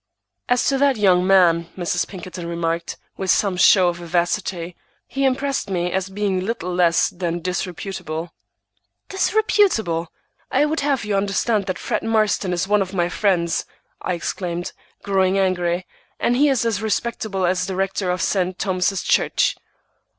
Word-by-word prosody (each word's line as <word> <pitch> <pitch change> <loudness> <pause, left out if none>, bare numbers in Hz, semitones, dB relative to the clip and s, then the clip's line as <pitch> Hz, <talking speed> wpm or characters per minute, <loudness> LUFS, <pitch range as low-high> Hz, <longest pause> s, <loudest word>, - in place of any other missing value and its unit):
"As 245 -1 +2
to 270 -1 +1
that 280 -3 +3
young 185 -3 +3
man," 170 -3 +4
Mrs. 175 -2 -1
Pinkerton 180 -2 -8
remarked, 170 0 -2 0.2
with 190 - -3
some 195 0 +3
show 185 0 +5
of 170 - -4
vivacity, 175 0 -2 0.3
"he 275 0 -1
impressed 270 -3 0
me 180 -2 -1
as 190 +1 -1
being 195 -1 -1
little 185 -2 -3
less 175 -2 +3
than 175 -1 -3
disreputable." 175 -2 -4 0.8
"Disreputable! 385 - +1 0.4
I 275 +3 +3
would 315 +2 -1
have 280 -5 0
you 210 -1 -1
understand 200 +1 0
that 185 -2 -2
Fred - - -2
Marston 215 -4 +1
is 180 +2 -1
one 205 0 +3
of 190 0 -3
my 175 -1 +1
friends," 175 -4 0 0.3
I 180 - -1
exclaimed, 175 0 -4 0.3
growing 190 -1 +2
angry, 180 -2 0 0.3
"and 240 - +1
he 290 +3 +4
is 260 -4 +1
as 220 -3 0
respectable 220 -3 -1
as 185 +1 0
the 190 - -3
rector 195 0 -1
of 180 -1 0
St. 185 -2 0
Thomas's 185 0 0
Church!" - - +2
185 Hz, 155 wpm, -21 LUFS, 175-210 Hz, 0.8 s, show